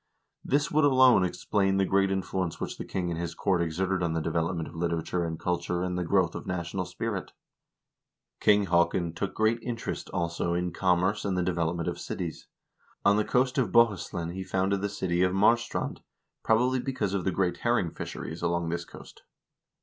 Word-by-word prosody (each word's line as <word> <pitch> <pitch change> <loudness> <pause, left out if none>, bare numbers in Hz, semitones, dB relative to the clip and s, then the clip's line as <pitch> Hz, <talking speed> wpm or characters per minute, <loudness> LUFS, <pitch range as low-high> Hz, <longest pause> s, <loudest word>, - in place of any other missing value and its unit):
This 145 +4 +1
would 155 0 +3
alone 130 -7 +6
explain 95 +2 0
the 95 - +3
great 95 +1 +2
influence 95 -2 -2
which - - -5
the - - -4
king 90 -2 -2
and 85 - -3
his 85 -1 -4
court 95 -3 +1
exerted 90 +3 -1
on 85 -2 0
the 80 - 0
development 80 +1 -1
of 80 - -11
literature 85 +1 -1
and 80 -1 -4
culture 90 0 -1
and 90 -1 -2
the 90 - -1
growth 90 -1 +2
of - - -6
a - - -13
national 90 0 -3
spirit. 95 +2 -4 1.1
King 105 -1 +4
Haakon 85 -1 +2
took 95 +3 -4
great 110 +2 +2
interest, 120 -2 -4
also, 85 0 -1
in 90 0 -1
commerce 95 +3 +1
and 95 -2 -1
the 90 - +1
de 90 +1 0
velopment 85 0 -1
of - - -3
cities. - - -5 0.6
On 100 - +6
the 105 - +3
coast 125 +4 +1
of 115 -8 0
Bohuslen 95 -7 +2
he 95 +1 -4
founded 95 +1 0
the 100 - -1
city 90 -3 -1
of 90 0 +3
Marstrand, 115 +4 +1 0.4
probably 125 +3 +2
because 125 -7 -2
of 95 -2 -1
the - - +1
great 90 -1 0
herring 120 -8 +1
fisheries 80 +1 -6
along 85 -1 0
this 85 +1 -3
coast. - - -13
90 Hz, 190 wpm, -28 LUFS, 85-100 Hz, 1.1 s, alone